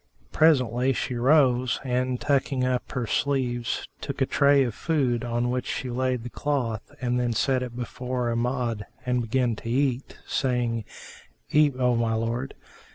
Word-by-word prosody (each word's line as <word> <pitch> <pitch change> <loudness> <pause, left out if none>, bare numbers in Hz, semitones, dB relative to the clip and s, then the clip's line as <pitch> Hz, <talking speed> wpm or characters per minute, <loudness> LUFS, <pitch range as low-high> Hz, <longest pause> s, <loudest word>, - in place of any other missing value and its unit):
Presently 130 -5 +3
she 125 - -2
rose 125 -1 +3
and, 125 -1 -1
tucking 140 -2 +1
up 125 -1 -1
her 125 -3 -1
sleeves, 125 -2 -1
took 140 -1 -5
a 135 - +3
tray 140 +1 +4
of 120 -4 -2
food 130 -7 0
on 120 0 -1
which 125 0 -2
she 125 - -3
laid 130 -1 -1
the 120 - -7
cloth 125 -7 -1 0.2
and 125 0 0
then 120 -1 0
set 130 +3 +1
it 125 -2 -5
before 125 0 -3
Amjad 120 -2 -1 0.2
and 125 0 +1
began 120 0 0
to 115 - -7
eat, 130 +1 0
saying, 120 -4 -1 0.7
"Eat, 150 -3 +4
O 125 -1 +2
my 115 -1 +1
lord." 115 +4 -2
125 Hz, 160 wpm, -26 LUFS, 120-135 Hz, 0.7 s, tray